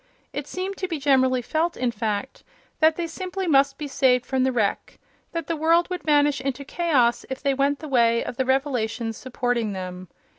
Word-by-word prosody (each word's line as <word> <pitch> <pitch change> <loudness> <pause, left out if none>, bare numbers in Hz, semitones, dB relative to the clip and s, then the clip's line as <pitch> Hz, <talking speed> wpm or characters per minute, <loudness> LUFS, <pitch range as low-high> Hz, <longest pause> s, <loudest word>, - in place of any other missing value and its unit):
It 285 +1 -4
seemed 375 +4 -4
to 370 - -2
be 335 -3 -3
generally 260 -3 +2
felt, 330 +6 -1
in 250 -1 0
fact, 220 +3 -3 0.4
that 315 0 +5
they 345 - -2
simply 370 +3 -4
must 275 -4 +3
be 300 - -5
saved 255 -2 +2
from 265 -1 0
the 260 - +2
wreck—that 245 +7 -4
the 330 - -2
world 330 +3 +2
would 360 - -3
vanish 290 -2 +3
into 275 +1 -3
chaos 270 -8 +1
if 265 - -6
they 280 -1 +2
went 280 +1 +1
the 310 - -8
way 235 -4 +3
of 240 - -6
the 260 - +1
revelations 250 -4 -1
supporting 245 -4 -2
them. 185 -1 -6
270 Hz, 190 wpm, -24 LUFS, 245-315 Hz, 0.4 s, that